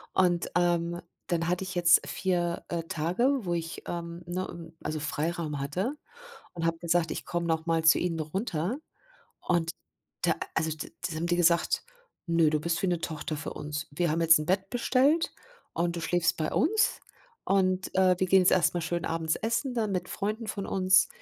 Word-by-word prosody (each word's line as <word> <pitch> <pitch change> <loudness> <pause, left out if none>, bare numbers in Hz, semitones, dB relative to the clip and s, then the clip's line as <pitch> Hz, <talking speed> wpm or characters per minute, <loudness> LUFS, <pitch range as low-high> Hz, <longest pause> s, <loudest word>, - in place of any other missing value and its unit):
Und, 175 -2 +2
ähm, 175 0 +1 0.3
dann 170 -1 0
hatte 180 +1 0
ich 185 -1 -6
jetzt 170 -1 +5
4, 175 -2 -1
äh, 170 -1 -2
Tage, 170 - 0 0.2
wo 175 - 0
ich, 165 0 -4
ähm 170 0 -5
ne, 175 -2 -5
also 155 0 -2
Freiraum 155 0 -2
hatte, 180 - -2 0.6
und 165 -1 -3
habe 165 0 0
gesagt: 170 -1 +1
„Ich - - -5
komme 175 0 -2
noch 160 0 0
mal 165 -1 +2
zu 160 - +7
Ihnen 170 -2 -1
runter." 175 - -2 0.6
Und 170 -2 +1 0.5
da - - +3 0.2
also 160 - 0
da 170 +2 -6
haben 160 +2 -2
die 175 - +2
gesagt: 170 -1 +3 0.4
„Nö, 165 -2 +4
du 155 - +1
bist 170 +2 -1
wie - - +3
'ne 175 -2 +1
Tochter 155 -1 -4
für 145 - -5
uns. 150 +1 -5
Wir 170 +2 0
haben 165 +2 0
jetzt 165 -1 +7
'n 155 - -3
Bett 190 +3 0
bestellt 265 +6 +2 0.4
und 170 0 0
du 170 - -4
schläfst 165 0 +1
bei 155 -1 -1
uns 415 +8 +2 0.4
und, 190 -1 +1
äh, 185 -1 +5
wir 185 - +1
gehen 190 +1 +6
jetzt 180 - +4
erst 170 -5 +3
mal 175 - 0
schön 170 +1 -2
abends 160 -1 0
essen 235 +4 -1
dann 220 -4 0
mit 180 -2 -2
Freunden 215 +3 -3
von 200 -2 -3
uns.” 190 0 +4
175 Hz, 190 wpm, -28 LUFS, 165-185 Hz, 0.6 s, zu